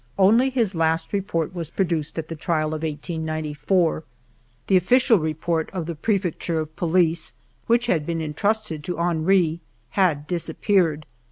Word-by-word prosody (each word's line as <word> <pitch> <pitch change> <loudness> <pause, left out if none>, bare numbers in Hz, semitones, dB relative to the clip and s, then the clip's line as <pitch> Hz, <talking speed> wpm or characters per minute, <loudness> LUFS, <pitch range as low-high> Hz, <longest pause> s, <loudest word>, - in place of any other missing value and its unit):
Only 225 +7 +5
his 235 -7 0
last 165 +1 0
report 185 -5 -1
was 170 -4 -4
pro 195 - 0
duced 160 -3 -3
at 160 -1 -3
the 165 - -6
trial 155 -1 0
of 155 0 -4
1894; 160 +2 -1 0.6
the 195 - +2
official 230 +4 +4
report 160 +1 -1
of 180 -4 -3
the 170 - -4
Prefecture 175 -2 -1
of 155 0 -5
Police, 170 -1 +1 0.3
which 235 +1 +3
had 160 -10 0
been 165 -1 -1
intrusted 160 +1 -1
to 180 - -3
Henry, 170 0 +2 0.3
had 165 -7 +1
disappeared. 170 -1 0
165 Hz, 150 wpm, -23 LUFS, 155-190 Hz, 0.6 s, Only